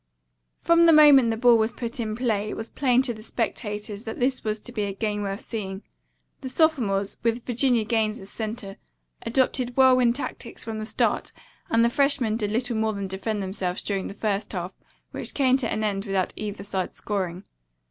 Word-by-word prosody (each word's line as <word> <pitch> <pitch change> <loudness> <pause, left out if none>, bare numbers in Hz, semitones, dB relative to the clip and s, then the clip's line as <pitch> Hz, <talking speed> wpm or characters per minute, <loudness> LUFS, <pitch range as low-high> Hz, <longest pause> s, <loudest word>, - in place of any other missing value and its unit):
From 335 0 +4
the 330 - +7
moment 290 -5 +7
the 225 - -1
ball 235 0 +5
was 220 +1 +1
put 235 0 -5
in 215 -2 -2
play 215 -4 0
it - - -5
was 225 - -5
plain 255 -2 +2
to 250 -3 0
the 215 - -11
spectators 210 -2 -4
that 220 - -6
this 255 +1 0
was 215 0 -1
to 245 - -9
be 215 -4 -2
a 200 - -3
game 210 0 -2
worth 200 +1 -3
seeing. 195 -3 -5 0.6
The 265 - -5
sophomores, 245 -10 +1
with 230 0 -1
Virginia 245 -1 +2
Gaines 220 -1 0
as 195 +1 -9
center, 215 -3 -5 0.5
adopted 250 +1 0
whirlwind 255 -2 +5
tactics 285 - -5
from 220 -1 -5
the 215 - -3
start - - 0 0.4
and 230 +1 +4
the - - +5
freshmen 275 -3 +1
did 210 -2 -1
little 235 +2 -1
more 220 0 +1
than 200 -1 -4
defend 195 +2 -3
themselves 185 -1 -3
during 195 -2 -2
the 200 - -8
first 210 -1 -2
half, 180 0 -4 0.4
which - - -6
came 260 -2 +4
to 250 -4 -2
an 215 - -1
end 200 -2 -1
without 195 -2 -1
either 205 -1 -5
side 190 -2 -3
scoring. 185 -3 -3
220 Hz, 200 wpm, -25 LUFS, 205-245 Hz, 0.6 s, the